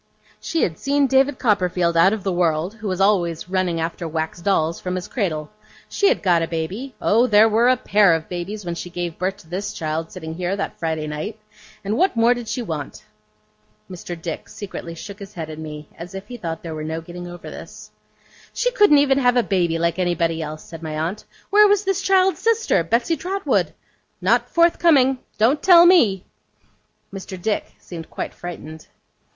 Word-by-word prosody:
She 330 - -1
had 160 -3 -2
seen 280 +1 +2
David 270 +1 +3
Copperfield 180 -6 +1
out 170 +4 +5
of 215 -3 -3
the 195 - 0
world, 175 +1 0
who 225 -1 -7
was 185 -1 -2
always 180 -5 +1
running 185 -3 0
after 165 +1 -3
wax 160 +2 -4
dolls 170 -4 +1
from 180 0 -3
his 180 -1 -4
cradle. 155 - -3 0.4
She 405 - +2
had - - +1
got 175 -3 +3
a 165 - -1
baby 185 +12 -4
oh, 235 +4 +3
there 215 -1 +6
were 225 +3 +3
a 255 - +4
pair 200 -4 +4
of 160 -1 -5
babies 185 +3 -5
when 170 - -3
she 170 +1 -6
gave 175 -1 -5
birth 185 +2 -1
to - - -18
this 185 +5 -4
child 160 +1 -3
sitting 160 -3 -7
here, 180 +3 -2
that 200 - -5
Friday 160 -2 -2
night! 155 +9 -5 0.5
and 205 +2 -1
what 370 -4 +2
more 230 +1 +4
did 240 -2 -7
she 245 +2 -3
want?' 155 -8 -6 0.9
Mr. 175 -1 -7
Dick 165 -1 -6
secretly 180 -4 -7
shook 200 +4 -9
his 200 +1 -11
head 160 -2 -5
at 155 - -8
me, 150 -1 -8
as 175 +3 -9
if 195 - -7
he 245 - -6
thought 165 -8 -5
there 165 -2 -5
was 155 0 -5
no 160 +1 -3
getting 175 +2 -9
over 175 0 -9
this. - - -11 0.6
'She - - +1
couldn't 415 -11 +5
even 280 -1 +3
have 245 -1 +3
a 245 - +4
baby 175 -5 0
like 170 +2 0
anybody 170 -2 0
else,' 155 0 -6
said 165 -1 -10
my 155 -1 -5
aunt. 170 +7 -3 0.3
'Where 420 +1 +7
was 410 0 +3
this 390 -2 0
child's 380 0 +3
sister, 455 - +2
Betsey 235 - +1
Trotwood? 390 +2 -1 0.4
Not - - +2
forthcoming. 325 -6 +4 0.2
Don't 245 +8 +3
tell 350 -2 +8
me!' 230 - +4 0.9
Mr. 190 -1 -7
Dick 210 +4 -2
seemed 165 -2 -9
quite - - -5
frightened. 160 -3 -9
185 Hz, 195 wpm, -21 LUFS, 165-240 Hz, 0.9 s, tell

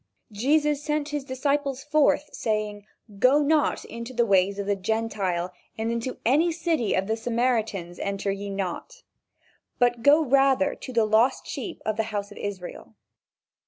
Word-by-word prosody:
Jesus 295 +7 +1
sent 300 0 -1
his 295 -2 -3
disciples 275 0 -1
forth 295 0 +2
saying: 210 -2 -2 0.3
"Go 275 +6 +5
not 300 0 +1
into 235 +2 -8
the 235 0 +3
way 195 -3 +4
of 200 0 -5
the 205 0 +1
Gentiles, 195 -4 -1 0.3
and 225 +1 -1
into 235 +2 -3
any 305 +8 +3
city 325 - 0
of 190 - 0
the 220 +2 0
Samaritans 225 -6 -1
enter 200 0 -2
ye 200 +1 -5
not, 195 - -5 0.7
but 240 -1 +2
go 295 +5 +6
rather 275 +1 +3
to 260 - -9
the 230 -3 +2
lost 220 +4 +2
sheep 355 - -6
of 215 -1 -1
the 220 - 0
house 205 -2 -4
of - - -11
Israel." 195 -3 -7
235 Hz, 160 wpm, -25 LUFS, 205-285 Hz, 0.7 s, go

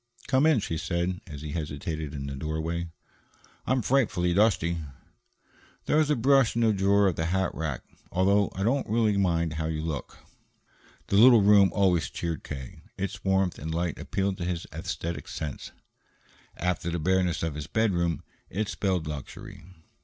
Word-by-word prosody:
"Come 135 +3 +4
in," 155 -6 +4
she 80 -5 -3
said, 90 +2 -2
as 75 -2 -8
he 75 - -5
hesitated 75 -1 -4
in 70 -1 -5
the 70 -1 -5
doorway. 80 +4 -3 0.8
"I - - 0
am 130 -2 +2
frightfully 100 -9 +2
dusty." 85 -4 +2 1.1
"There's 150 0 +2
a 150 - +3
brush 135 0 +3
in 115 - +2
the 110 -1 +4
drawer 100 +1 +3
of 95 -4 +1
the 80 - 0
hat 95 +1 0
rack 75 -6 -4 0.3
although 100 +3 +3
I 95 - -2
don't 130 +4 +1
really 110 -1 +2
mind 85 -5 +1
how 80 +1 -2
you 80 -1 -3
look." 80 -4 -5 0.9
The 100 - +3
little 115 -1 +8
room 100 -1 +6
always 90 -9 +2
cheered 85 -3 -4
K. 65 -4 -8 0.2
Its 95 0 -4
warmth 95 -2 +1
and 80 +2 -5
light 85 -1 -2
appealed 95 -1 -2
to - - -3
his 90 -1 -3
aesthetic 85 +1 -4
sense; 75 -3 -6 0.9
after 90 -1 -1
the 85 - -2
bareness 90 0 +1
of 80 -2 -1
his 75 +1 -6
bedroom, 85 -5 0 0.3
it 105 +2 -2
spelled 95 -6 -1
luxury. 75 -3 -8
90 Hz, 170 wpm, -27 LUFS, 80-100 Hz, 1.1 s, little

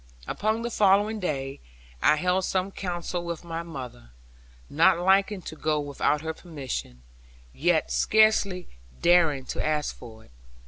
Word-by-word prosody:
Upon 220 - -1
the 235 - -3
following 205 +1 +3
day, 135 -7 -3 0.4
I - - +5
held 180 +4 +1
some 190 +1 -1
council 175 -2 -4
with 170 -1 -5
my 165 -1 -4
mother; 130 - -9 0.6
not 170 +4 +4
liking 190 +2 +2
to 160 - -7
go 155 -1 0
without 145 +1 0
her 160 0 -3
permission, 135 - -7 0.5
yet 165 +1 +1
scarcely 210 -4 +3 0.3
daring 165 -6 +3
to - - -3
ask 150 -1 -1
for 110 -2 -13
it. - - -24
170 Hz, 140 wpm, -26 LUFS, 150-190 Hz, 0.6 s, I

